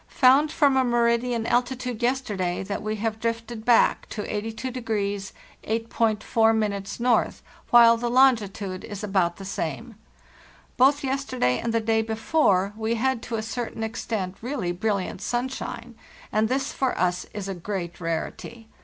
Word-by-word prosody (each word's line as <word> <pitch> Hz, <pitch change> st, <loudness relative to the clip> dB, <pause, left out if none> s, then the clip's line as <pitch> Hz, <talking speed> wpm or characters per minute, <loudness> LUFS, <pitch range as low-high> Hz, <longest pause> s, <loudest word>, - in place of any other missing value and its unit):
Found 280 Hz, +4 st, +5 dB
from 280 Hz, -4 st, +3 dB
a 260 Hz, -, +4 dB
meridian 235 Hz, -1 st, +1 dB
altitude 250 Hz, -1 st, -1 dB
yesterday 210 Hz, -9 st, -1 dB
that 200 Hz, +1 st, -4 dB
we 215 Hz, 0 st, -2 dB
have 220 Hz, +1 st, -2 dB
drifted 230 Hz, 0 st, -3 dB
back 235 Hz, 0 st, +3 dB
to 210 Hz, -, -4 dB
82° 225 Hz, +5 st, -4 dB, 0.8 s
8.4' 225 Hz, 0 st, +1 dB, 0.7 s
N., -, -, -13 dB, 0.4 s
while 235 Hz, -1 st, +7 dB
the 240 Hz, +1 st, -2 dB
longitude 215 Hz, -7 st, +2 dB
is 205 Hz, -1 st, -7 dB
about 190 Hz, -4 st, +1 dB
the 195 Hz, -, -9 dB
same. 190 Hz, -, -4 dB, 0.8 s
Both 275 Hz, +3 st, +4 dB
yesterday 260 Hz, -, 0 dB
and 230 Hz, -, -2 dB
the 230 Hz, -, +2 dB
day 220 Hz, 0 st, +1 dB
before 220 Hz, -, +1 dB
we 225 Hz, +1 st, -1 dB
had 260 Hz, +1 st, 0 dB
to 235 Hz, -, -4 dB
a 220 Hz, -, -2 dB
certain 225 Hz, 0 st, -4 dB
extent 215 Hz, -4 st, -3 dB
really 235 Hz, -7 st, -2 dB
brilliant 195 Hz, +1 st, -2 dB
sunshine, 240 Hz, -1 st, -4 dB, 0.4 s
and 215 Hz, +1 st, +2 dB
this 265 Hz, +1 st, -1 dB
for 265 Hz, -2 st, -1 dB
us 180 Hz, 0 st, 0 dB
is 205 Hz, -2 st, -5 dB
a 195 Hz, -, -3 dB
great 180 Hz, -1 st, -5 dB
rarity. 200 Hz, +7 st, -5 dB
225 Hz, 145 wpm, -25 LUFS, 205-245 Hz, 0.8 s, while